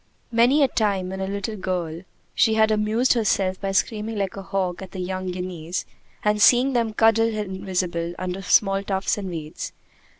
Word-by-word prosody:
Many 245 +6 +4
a - - +5
time, 200 -6 0
when 190 0 -5
a 190 - -2
little 200 +2 -3
girl, 175 -4 -3 0.3
she 220 - +3
had 220 0 +4
amused 215 +4 +2
herself 195 -5 0
by 195 -1 -1
screaming 215 +3 -1
like 195 -2 -2
a 195 - -6
hawk 190 -2 -2
at 190 - -9
the 190 - -6
young 185 0 -3
guineas, 180 -1 -4 0.4
and 210 0 +2
seeing 250 +5 +6
them 230 -2 +1
cuddle 225 +1 +4
invisible 185 -5 -3
under 185 +1 -4
small 195 0 +3
tufts 195 +1 -1
and 195 -2 -5
weeds. 155 -3 -6
195 Hz, 175 wpm, -23 LUFS, 185-220 Hz, 0.4 s, seeing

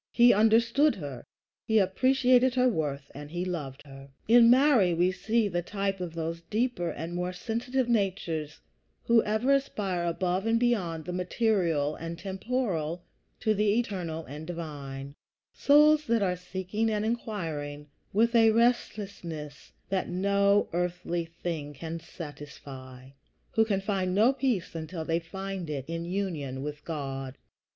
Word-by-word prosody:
He 240 0 +7
understood 230 +7 +4
her, 140 -7 -7 0.4
he 220 - +2
appreciated 255 +5 +3
her 255 0 +4
worth, 145 - -2
and 145 +1 -9
he 175 +3 -3
loved 150 -7 -5
her. 135 -1 -12 0.2
In 235 +1 +7
Mary 245 - +5
we 175 +2 +3
see 215 +4 +1
the 175 -3 -1
type 195 +1 -2
of 170 -2 -5
those 165 0 -3
deeper 215 -6 0
and 165 +3 -5
more 180 +1 -2
sensitive 235 +6 -2
natures 180 -9 -1 0.4
who 235 -1 +5
ever 220 +6 +2
aspire 200 -10 -1
above 180 +4 -1
and 230 0 +3
beyond 180 -10 0
the 180 - -4
material 180 -6 +1
and 165 +1 -6
temporal 190 -4 -2 0.4
to 215 - +2
the 210 +1 +2
eternal 175 -8 -3
and 150 +3 -8
divine; 140 -5 -6 0.4
souls 300 +1 +5
that 230 -2 +2
are 180 -2 +1
seeking 190 +5 -2
and 215 -1 0
inquiring 165 -11 -3 0.3
with 230 +4 +2
a 225 -1 +6
restlessness 200 -9 -1 0.2
that 190 -1 -1
no 200 +2 +2
earthly 175 -1 -1
thing 165 -3 -5
can 165 +4 -5
satisfy, 140 -5 -10 0.4
who 225 -3 +4
can 200 -3 0
find 190 -2 -1
no 225 +6 +5
peace 245 -11 -1
until 160 0 -5
they 165 +1 +1
find 190 0 -6
it 140 -3 -3
in 165 +1 -4
union 165 -8 -3
with 150 0 -6
God. 135 -4 -5
180 Hz, 145 wpm, -28 LUFS, 160-220 Hz, 0.4 s, He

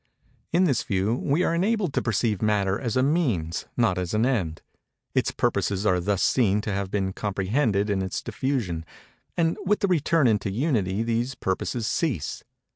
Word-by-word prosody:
In 175 +3 +3
this 140 -10 +2
view, 100 +3 0
we 145 +7 +1
are - - +1
enabled 190 -1 +1
to - - +1
perceive 110 -2 0
Matter 100 -3 +1
as 120 -2 -2
a 130 - +3
Means—not 115 - 0
as 90 +2 -2
an 110 +2 +3
End. 95 -12 -1 0.5
Its - - +2
purposes 100 +1 0
are 90 -3 +3
thus 100 +1 0
seen 105 -5 +3
to 105 -1 -3
have 100 -1 -2
been 95 -1 -1
comprehended 100 +2 0
in 100 -2 0
its 95 0 -3
diffusion; 115 -8 -2 0.5
and 165 -1 +1
with 205 +2 +1
the 200 - +3
return 165 -3 +2
into 105 -3 +1
Unity 110 - 0
these 120 +3 -1
purposes 110 +4 -2
cease. 110 - -1
110 Hz, 170 wpm, -25 LUFS, 95-135 Hz, 0.5 s, In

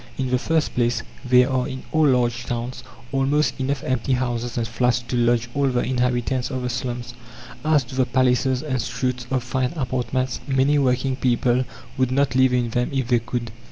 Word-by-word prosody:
In 130 -2 -2
the 125 - +2
first 160 +3 0
place, 120 -1 +1 0.2
there 125 0 +5
are 130 0 0
in 130 -2 -6
all 155 -1 +4
large 120 -2 +1
towns 120 +1 -4 0.3
almost 140 +2 +1
enough 135 +1 -1
empty 130 +1 0
houses 120 -1 -2
and 115 -1 0
flats 125 +2 +1
to 120 +1 -5
lodge 120 -1 +2
all 140 -1 +1
the 125 -2 +1
inhabitants 125 0 0
of 130 -2 -3
the 125 - -1
slums. 120 0 -4 0.5
As 155 -2 +3
to 120 - -12
the 130 -1 +1
palaces 130 +1 +2
and 130 -5 -1
suites 125 +1 -3
of 130 -2 0
fine 125 +2 -1
apartments, 130 -2 -1
many 135 +2 +3
working 130 0 +1
people 125 0 +2 0.3
would 130 -1 +3
not 140 -1 +2
live 130 0 +4
in 125 -2 +1
them 125 +1 0
if 130 -3 -1
they 120 -2 +4
could. 120 0 -4
125 Hz, 195 wpm, -23 LUFS, 120-130 Hz, 0.5 s, there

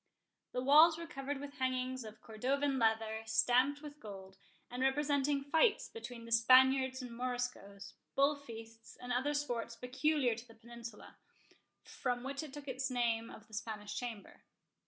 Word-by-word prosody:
The 250 - -1
walls 310 +4 +7
were 335 - -6
covered 280 -4 -4
with 285 0 -9
hangings 255 0 -1
of 215 -1 -11
cordovan 265 +5 0
leather, 220 -1 +1
stamped 250 +6 +3
with 295 0 -9
gold, 190 -4 -10 0.4
and 250 +1 -4
representing 280 +1 +2
fights 320 - +2
between 245 - -8
the 230 - -10
Spaniards 260 +3 +5
and 250 - -7
Moriscoes, 245 -6 -4 0.2
bull 280 +2 +4
feasts, 225 -4 -11
and 245 0 -4
other 280 +4 0
sports 240 -5 -2
peculiar 255 +2 +1
to 230 +2 -9
the 225 - -16
Peninsula, 235 -1 -11 0.7
from 245 -2 -3
which 275 +2 -3
it 310 -3 -8
took 285 0 -9
its 260 0 -2
name 230 -2 0
of 220 - -12
the 220 - -20
Spanish 210 -1 -5
Chamber. 225 -3 -6
250 Hz, 155 wpm, -35 LUFS, 225-280 Hz, 0.7 s, walls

